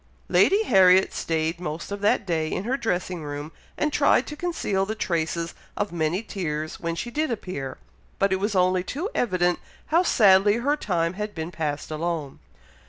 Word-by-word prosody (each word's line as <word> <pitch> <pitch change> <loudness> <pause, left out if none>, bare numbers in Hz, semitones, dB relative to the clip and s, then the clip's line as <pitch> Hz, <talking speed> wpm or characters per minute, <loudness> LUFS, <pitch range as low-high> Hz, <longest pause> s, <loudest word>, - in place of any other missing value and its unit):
Lady 405 +3 +4
Harriet 190 - +5
stayed 160 +1 -1
most 165 +1 -5
of 200 0 -4
that 205 0 +2
day 160 -3 -1
in 185 - -2
her 245 +5 0
dressing 180 -8 -2
room, 145 +1 -6 0.3
and 300 0 0
tried - - +4
to 300 - -7
conceal 300 - -1
the 215 +3 -3
traces 170 -4 -2 0.2
of 205 0 -1
many 170 +4 -1
tears 155 -7 -4
when 170 0 -2
she 240 +8 -4
did 310 +4 0
appear; 180 - -4 0.4
but 195 -1 +2
it 190 - 0
was 205 +1 -1
only 185 0 +3
too 305 - -4
evident 180 -6 +1 0.3
how 335 - +6
sadly 205 - +5
her 275 +5 +1
time 170 - -1
had 210 +2 -5
been 160 +1 -4
passed 150 -3 -3
alone. 155 -3 -3
185 Hz, 175 wpm, -25 LUFS, 165-210 Hz, 0.4 s, how